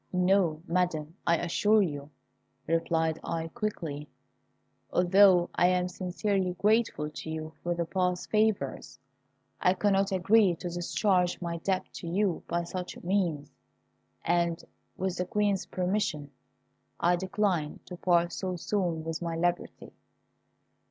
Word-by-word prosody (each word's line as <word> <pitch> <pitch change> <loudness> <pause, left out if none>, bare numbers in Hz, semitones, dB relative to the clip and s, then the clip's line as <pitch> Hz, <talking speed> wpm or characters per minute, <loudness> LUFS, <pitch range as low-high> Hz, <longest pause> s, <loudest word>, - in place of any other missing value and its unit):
"No, 180 -3 +2
Madam, 165 -3 -1
I 170 0 +4
assure 205 +6 +3
you," 145 -4 -4 0.6
replied 165 -1 0
I, 165 -1 -3
quickly. 165 -8 -4 0.8
"Although 180 -1 +5
I 175 - +4
am 180 0 +2
sincerely 185 +1 -1
grateful 210 -8 +1
to 160 - -7
you 160 0 -5
for 175 0 -1
past 180 +1 -1
favours, 215 -10 0 0.6
I 180 +1 +3
cannot 195 0 +2
agree 195 0 +4
to 175 +2 -6
discharge 180 +1 +1
my 170 -1 -3
debt 185 +2 -1
to 170 - -7
you 185 +1 0
by 170 0 -1
such 180 +1 -6
means; 175 -6 -1 0.7
and, 170 0 +1 0.3
with 185 -1 -2
the 180 - -1
Queen's 205 0 0
permission, 180 -6 -1 0.7
I 175 +1 +3
decline 185 -4 -1
to 180 - -8
part 175 -1 +2
so 185 -1 -3
soon 175 -3 -1
with 165 +1 -4
my 170 -1 -2
liberty. 175 +1 -2
180 Hz, 125 wpm, -29 LUFS, 165-190 Hz, 0.8 s, Although